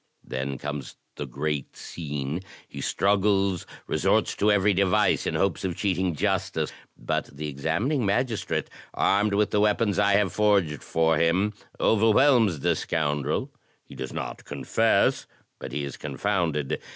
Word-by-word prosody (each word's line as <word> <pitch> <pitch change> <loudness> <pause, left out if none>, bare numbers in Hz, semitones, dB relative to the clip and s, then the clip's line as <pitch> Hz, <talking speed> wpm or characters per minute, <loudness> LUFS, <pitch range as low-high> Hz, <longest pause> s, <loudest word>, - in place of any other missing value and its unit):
Then 65 +1 -4
comes 75 -1 -6 0.2
the 75 - -5
great 70 +2 -3
scene; 75 0 -4 0.3
he - - -8
struggles, 100 -2 +1 0.2
resorts - - +1
to 105 +1 +3
every 105 0 +3
device 95 -1 +2
in - - -1
hopes 100 +1 0
of 90 -3 -2
cheating 95 -4 0
justice; 95 -4 -1 0.2
but - - -2
the 75 +2 -7
examining 85 - -1
magistrate, 110 +2 0 0.3
armed 100 +1 +2
with 105 0 +2
the 105 - +2
weapons 105 -1 +2
I 100 -1 +4
have 100 -3 +2
forged 100 -8 +2
for 80 -1 +2
him, 90 +6 +2 0.3
overwhelms 110 - +4
the - - +2
scoundrel; 75 -2 -1 0.3
he - - -14
does 65 - -6
not - - -5
confess, - - +1 0.3
but - - -7
he 75 - -2
is 70 -2 -6
confounded. 85 -9 -1
95 Hz, 140 wpm, -26 LUFS, 75-105 Hz, 0.3 s, I